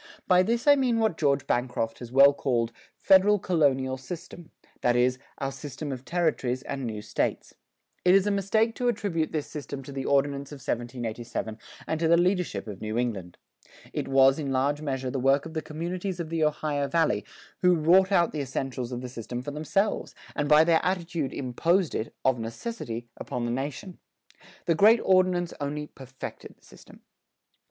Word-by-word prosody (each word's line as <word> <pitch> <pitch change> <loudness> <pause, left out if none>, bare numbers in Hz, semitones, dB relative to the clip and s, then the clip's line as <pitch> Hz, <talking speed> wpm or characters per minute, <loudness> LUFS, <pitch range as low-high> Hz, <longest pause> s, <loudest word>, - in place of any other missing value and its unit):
By 180 -1 +6
this 230 +5 0
I 290 -1 +7
mean 255 -4 +1
what 220 -6 +1
George 140 -3 +1
Bancroft 120 -2 -1
has 120 -1 -9
well 140 +2 +7
called 120 -5 0 0.3
"federal 200 +2 +5
colonial 135 -8 +1
system," 170 +4 -9 0.3
that 120 -1 +2
is, 125 +1 +2 0.2
our 135 0 -2
system 145 +1 -6
of 130 0 -6
territories 155 -7 0
and 135 -1 -5
new 105 -2 -5
States. - - -2 0.5
It 180 +1 +6
is 195 0 +4
a 205 - +1
mistake 220 +3 +1
to 245 - 0
attribute 180 -9 -1
this 155 -2 -2
system 140 -2 -7
to 140 - -9
the 135 -1 -4
Ordinance 140 0 +1
of - - -6
1787 120 -3 -4 0.3
and 160 - -2
to 165 - +2
the 170 +1 +5
leadership 180 0 0
of 100 -3 -8
New 110 +1 -3
England. 100 -8 -3 0.6
It - - -3
was 135 +1 +5
in 140 -3 -3
large 140 +3 +1
measure 135 -3 -3
the 135 - -2
work 135 +3 +3
of 165 - -8
the 160 - -2
communities 175 +4 -4
of 165 -2 -4
the 165 -1 0
Ohio 150 -1 -1
Valley 155 - +1 0.4
who 180 -1 +5
wrought 180 +5 +4
out 175 -3 +3
the 150 - -3
essentials 130 -2 -4
of 125 0 -4
the 130 - -5
system 120 0 -6
for 145 - -5
themselves, 195 +8 -1 0.2
and 145 -1 -1
by 150 +1 +7
their 165 0 +3
attitude 170 -5 -1
imposed 165 +7 0
it, 110 - -3
of 130 -2 +3
necessity, 115 - -5
upon 120 -1 -4
the 120 - -1
nation. 145 +8 -5 0.7
The 170 - +3
great 215 +8 +6
Ordinance 185 -2 +2
only 150 +1 -3
perfected 130 -2 -10
the - - -26
system. - - -16
145 Hz, 180 wpm, -27 LUFS, 130-175 Hz, 0.7 s, I